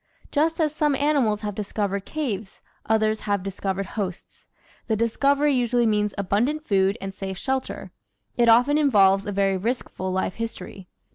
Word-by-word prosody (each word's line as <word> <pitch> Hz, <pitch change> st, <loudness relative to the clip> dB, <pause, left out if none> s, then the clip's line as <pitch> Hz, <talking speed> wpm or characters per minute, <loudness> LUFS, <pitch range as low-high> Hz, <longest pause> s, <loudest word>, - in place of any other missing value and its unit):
Just 320 Hz, +3 st, +1 dB
as 305 Hz, -2 st, +1 dB
some 300 Hz, -2 st, +1 dB
animals 270 Hz, -8 st, +1 dB
have 210 Hz, -1 st, -3 dB
discovered 200 Hz, -1 st, -3 dB
caves, 220 Hz, -10 st, -4 dB, 0.3 s
others 220 Hz, 0 st, +2 dB
have 200 Hz, -2 st, +1 dB
discovered 195 Hz, 0 st, -3 dB
hosts. 190 Hz, -2 st, -6 dB, 0.4 s
The 220 Hz, -, +1 dB
discovery 280 Hz, +6 st, +2 dB
usually 245 Hz, -1 st, +2 dB
means 210 Hz, -1 st, +1 dB
abundant 240 Hz, +11 st, 0 dB
food 195 Hz, +1 st, +2 dB
and 195 Hz, 0 st, -6 dB
safe 190 Hz, -1 st, -6 dB
shelter; 265 Hz, +5 st, -3 dB, 0.4 s
it 235 Hz, -1 st, +3 dB
often 250 Hz, +6 st, +5 dB
involves 200 Hz, -9 st, +4 dB
a -, -, -2 dB
very 195 Hz, -1 st, +1 dB
riskful 205 Hz, -3 st, -3 dB
life 185 Hz, 0 st, -1 dB
history. 215 Hz, -4 st, -7 dB
215 Hz, 150 wpm, -24 LUFS, 195-265 Hz, 0.4 s, often